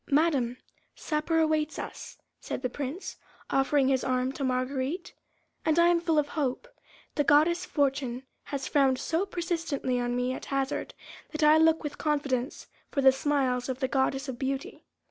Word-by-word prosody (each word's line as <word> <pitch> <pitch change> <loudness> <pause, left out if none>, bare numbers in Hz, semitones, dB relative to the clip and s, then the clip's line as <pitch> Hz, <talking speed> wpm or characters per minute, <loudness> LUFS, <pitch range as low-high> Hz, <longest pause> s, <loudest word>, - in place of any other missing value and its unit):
"Madame, 280 -5 +2 0.4
supper 310 +1 -1
awaits 310 -1 +1
us," - - -7 0.2
said - - -5
the 250 - 0
Prince, 290 +8 -5 0.3
offering 270 0 +3
his 265 -1 +2
arm 255 0 0
to 275 - -5
Marguerite, 260 +6 -2 0.5
"and 315 0 +2
I 340 0 +6
am 345 -1 +3
full 330 -2 +1
of 295 -1 +2
hope. 290 - -2 0.5
The 290 - +1
goddess 330 +5 +4
Fortune 275 -5 0 0.2
has 275 -2 -4
frowned 270 -3 +3
so 330 +9 -1
persistently 330 -8 -2
on 245 0 -1
me 250 +1 0
at - - -7
hazard, 275 0 -2 0.4
that 310 0 -1
I 305 +1 +7
look 320 0 +4
with 295 -1 -5
confidence 280 -3 -1 0.2
for 280 - 0
the 265 0 +8
smiles 265 -2 0
of 260 0 -3
the 260 - +1
goddess 270 +1 0
of 250 -3 -5
Beauty." 275 +9 -4
280 Hz, 165 wpm, -28 LUFS, 260-315 Hz, 0.5 s, the